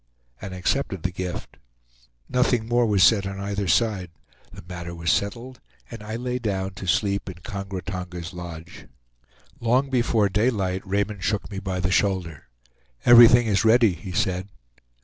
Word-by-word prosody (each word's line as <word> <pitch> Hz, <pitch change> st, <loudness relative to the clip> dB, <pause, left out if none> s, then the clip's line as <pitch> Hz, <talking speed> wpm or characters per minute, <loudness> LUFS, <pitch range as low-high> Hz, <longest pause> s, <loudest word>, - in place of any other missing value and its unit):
and 95 Hz, -, -6 dB
accepted 95 Hz, 0 st, -2 dB
the 90 Hz, -, -1 dB
gift. 90 Hz, -1 st, -6 dB, 0.7 s
Nothing 125 Hz, -3 st, +1 dB
more 120 Hz, 0 st, +2 dB
was 100 Hz, -3 st, +3 dB
said 100 Hz, -1 st, +4 dB
on 95 Hz, 0 st, -6 dB
either 100 Hz, 0 st, -3 dB
side; 100 Hz, -2 st, +1 dB, 0.4 s
the -, -, -11 dB
matter 85 Hz, -1 st, -7 dB
was 85 Hz, -2 st, 0 dB
settled, 120 Hz, +5 st, -2 dB, 0.3 s
and 115 Hz, -2 st, -8 dB
I 110 Hz, +1 st, -6 dB
lay 125 Hz, +1 st, -3 dB
down 95 Hz, -4 st, -2 dB
to 95 Hz, -, -8 dB
sleep 100 Hz, +2 st, 0 dB
in 90 Hz, -, -8 dB
Kongra 100 Hz, -3 st, -6 dB
Tonga's 90 Hz, -3 st, -6 dB
lodge. 85 Hz, -1 st, -9 dB, 0.7 s
Long 130 Hz, +4 st, +1 dB
before 120 Hz, -4 st, +2 dB
daylight 100 Hz, -3 st, 0 dB
Raymond 100 Hz, 0 st, -2 dB
shook 105 Hz, +2 st, -2 dB
me 95 Hz, -, -4 dB
by 95 Hz, -1 st, -3 dB
the 90 Hz, 0 st, -1 dB
shoulder. 95 Hz, -6 st, -1 dB, 0.6 s
"Everything 120 Hz, 0 st, +8 dB
is 105 Hz, -1 st, +1 dB
ready," 115 Hz, -2 st, +5 dB
he 85 Hz, +2 st, -9 dB
said. 95 Hz, -1 st, -1 dB
100 Hz, 155 wpm, -24 LUFS, 90-115 Hz, 0.7 s, Everything